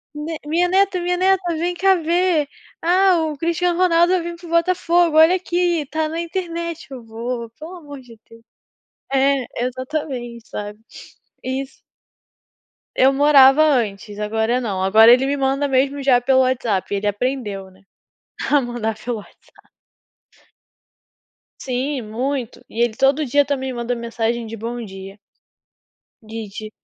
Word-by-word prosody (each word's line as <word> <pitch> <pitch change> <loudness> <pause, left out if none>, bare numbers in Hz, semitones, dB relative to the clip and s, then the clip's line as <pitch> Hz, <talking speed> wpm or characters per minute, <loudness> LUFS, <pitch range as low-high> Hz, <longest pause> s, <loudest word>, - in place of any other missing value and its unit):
me 310 +2 -5
minha 340 +4 +2
neta, 385 0 +2
minha 355 +1 -1
neta, 380 +1 +2
vem 350 +2 -2
cá 385 +2 +4
ver. 335 -3 +1 0.3
"Ah, 365 +2 +4
o 295 - -8
Cristiano 340 +2 0
Ronaldo 345 -1 +4
vai 370 - +2
vim 340 0 -5
para 345 - -12
o - - -11
Botafogo. 335 -1 +2
Olha 320 +3 +7
aqui, 350 -2 0
está 310 +2 -3
na 325 +1 -4
internet", 335 -1 -5
eu 255 -3 -8
"Vô, 230 +1 -5
pelo 330 +4 -9
amor 285 -5 -11
de 235 -3 -16
Deus". 230 0 -16 0.7
É 270 -1 +2 0.2
exatamente 255 -3 -5
sabe, 210 0 -6 0.6
isso. 265 +1 -5 1.2
Eu 265 +1 +5
morava 280 0 +6
antes, 215 -8 0
agora 220 +3 0
não. 195 -6 -3
Agora 220 +4 +6
ele 255 +2 +4
me 285 +1 0
manda 275 +1 0
mesmo 275 +1 +1
já 260 -3 +4
pelo 260 +2 +3
WhatsApp. 240 -7 0
E - - +1
ele 210 - -4
aprendeu, 205 -3 -3
né, 190 +1 -23 0.7
a 290 -1 +5
mandar 240 -3 -3
pelo 235 +2 -4
WhatsApp. 205 - -18 1.9
Sim, 265 +2 -2
muito. 245 +3 -4
E 230 - -6
ele 240 -2 +2
todo 275 +3 +2
dia 285 +3 +3
também 265 -2 -3
manda 240 +1 -2
mensagem 235 0 -3
de 225 +1 -7
bom 235 +2 -5
dia. 195 0 -10 1.1
Digi 215 -1 -8
270 Hz, 150 wpm, -20 LUFS, 230-330 Hz, 1.9 s, Olha